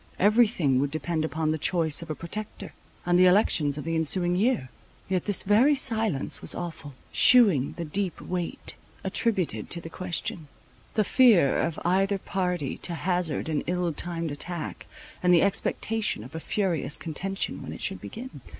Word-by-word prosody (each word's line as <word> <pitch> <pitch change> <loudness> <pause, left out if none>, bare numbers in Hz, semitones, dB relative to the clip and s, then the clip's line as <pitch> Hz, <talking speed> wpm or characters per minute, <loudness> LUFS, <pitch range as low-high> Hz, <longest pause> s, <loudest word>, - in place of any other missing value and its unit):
Every 215 +4 +5
thing 145 - +1
would 140 +1 0
depend 155 +2 -2
upon 160 0 -1
the 155 - -2
choice 165 -2 +1
of 170 - -9
a 155 - -2
Protector, 200 +3 -6 0.3
and 175 0 +3
the 185 - +7
elections 165 -7 +2
of 150 - -4
the 165 - -3
ensuing 175 +2 +1
year. 205 - +1 0.4
Yet 185 -2 -1
this 205 -2 0
very 235 +9 +4
silence 220 - -1
was - - -1
awful, 160 -5 -7 0.2
shewing 200 - +5
the 170 - -4
deep 185 +3 -2
weight 180 -2 -5 0.3
attributed 190 - -1
to 170 - +2
the 165 -1 -9
question; 170 -3 -3 0.5
the 215 - +3
fear 205 - +5
of 165 -1 -1
either 195 +3 +2
party 180 -7 -2
to 170 - -4
hazard 175 -4 0
an 155 -2 -1
ill 180 -1 0
timed 170 0 -3
attack, 170 +3 -5 0.3
and 180 - +3
the 175 - +6
expectation 210 - -1
of 130 - -12
a 160 - -4
furious 170 -5 -1
contention 190 +4 -4
when - - -7
it - - -7
should 195 - -2
begin. 255 +4 -9
175 Hz, 170 wpm, -26 LUFS, 160-195 Hz, 0.5 s, the